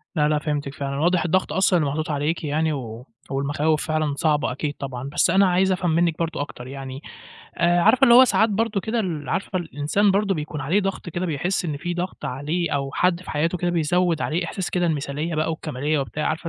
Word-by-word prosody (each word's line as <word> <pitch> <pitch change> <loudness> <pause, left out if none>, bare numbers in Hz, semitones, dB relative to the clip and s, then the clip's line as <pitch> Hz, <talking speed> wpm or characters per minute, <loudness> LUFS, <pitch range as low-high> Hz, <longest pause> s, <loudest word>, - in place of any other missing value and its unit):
لا، 150 -2 +3
لأ 150 - +2
فهمتِك 145 -2 -3
فعلًا، 140 0 -4
واضح 175 +3 +2
الضغط 185 +2 +1
أصلًا 190 -2 +3
اللي 145 - 0
محطوط 155 +3 -3
عليكِ 150 +3 -1
يعني، 155 +1 0
و 120 -2 -6 0.2
والمخاوف 145 +3 0
فعلًا 155 -2 0
صعبة 150 -3 +1
أكيد 145 +3 -3
طبعًا 135 -1 -5
بس 140 - +2
أنا 195 +2 +5
عايز 190 +2 +2
أفهم 180 -1 0
منِّك 165 0 +2
برضه 165 -3 -2
أكتر 130 -3 -7
يعني 135 0 -7 0.6
آآ، 175 +1 +3
عارفة 260 +10 +4
اللي 240 -3 +8
هو 255 +2 +10
ساعات 225 -2 +3
برضه 215 0 0
كده 230 +1 -1
ال 165 -8 -3
عارفة 190 -1 -1
الإنسان 175 +5 +1
برضه 200 0 +1
بيكون 150 0 -5
عليه 180 +10 +1
ضغط 195 -2 -3
كده 175 +2 -3
بيحس 175 +4 -1
إن 150 -3 -3
في 175 +4 -3
ضغط 180 +2 -4
عليه 150 +7 -2
أو 140 -1 -1
حد 180 -1 +1
في - - -7
حياته 165 +4 0
كده 175 +1 -1
بيزوّد 170 0 +1
عليه 165 +3 -1
إحساس 190 -3 -4
كده 175 -1 0
المثالية 155 +1 -2
بقى 155 +1 0
والكمالية 150 -1 -2
وبتاع، 135 +3 -2
عارفة 160 +2 -2
160 Hz, 215 wpm, -23 LUFS, 145-180 Hz, 0.6 s, هو